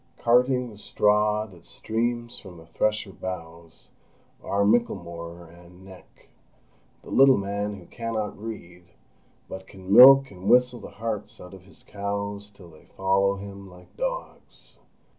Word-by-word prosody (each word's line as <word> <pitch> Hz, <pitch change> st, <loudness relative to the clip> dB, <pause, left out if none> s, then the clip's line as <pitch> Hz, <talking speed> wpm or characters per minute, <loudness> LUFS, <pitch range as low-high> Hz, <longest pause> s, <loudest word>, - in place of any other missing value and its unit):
Carting 125 Hz, +1 st, +2 dB
the 105 Hz, -, -14 dB
straw 105 Hz, +1 st, +1 dB
that 90 Hz, -5 st, -16 dB
streams 120 Hz, +3 st, -3 dB
from 90 Hz, -3 st, -12 dB
the 80 Hz, -, -14 dB
thresher 105 Hz, +5 st, -1 dB
bows, 85 Hz, -3 st, -9 dB, 0.5 s
are 100 Hz, 0 st, 0 dB
Michelmore 85 Hz, -6 st, -1 dB
and 90 Hz, +2 st, -17 dB
Neck—the 90 Hz, -8 st, -19 dB
little 135 Hz, 0 st, +6 dB
man 100 Hz, +1 st, -3 dB
who 95 Hz, -3 st, -13 dB
cannot 110 Hz, 0 st, -4 dB
read, 90 Hz, -5 st, -10 dB, 0.5 s
but 95 Hz, 0 st, -9 dB
can 95 Hz, 0 st, -6 dB
milk 135 Hz, +2 st, +9 dB
and 95 Hz, +1 st, -6 dB
whistle 125 Hz, 0 st, +4 dB
the -, -, -10 dB
hearts 110 Hz, -1 st, -5 dB
out 90 Hz, +1 st, -12 dB
of 95 Hz, -1 st, -14 dB
his 95 Hz, -, -14 dB
cows 100 Hz, 0 st, -5 dB
till 95 Hz, -4 st, -16 dB
they 80 Hz, -, -19 dB
follow 95 Hz, +1 st, +2 dB
him 100 Hz, 0 st, -10 dB
like 90 Hz, 0 st, -17 dB
dogs. -, -, -7 dB
100 Hz, 140 wpm, -25 LUFS, 90-110 Hz, 0.5 s, milk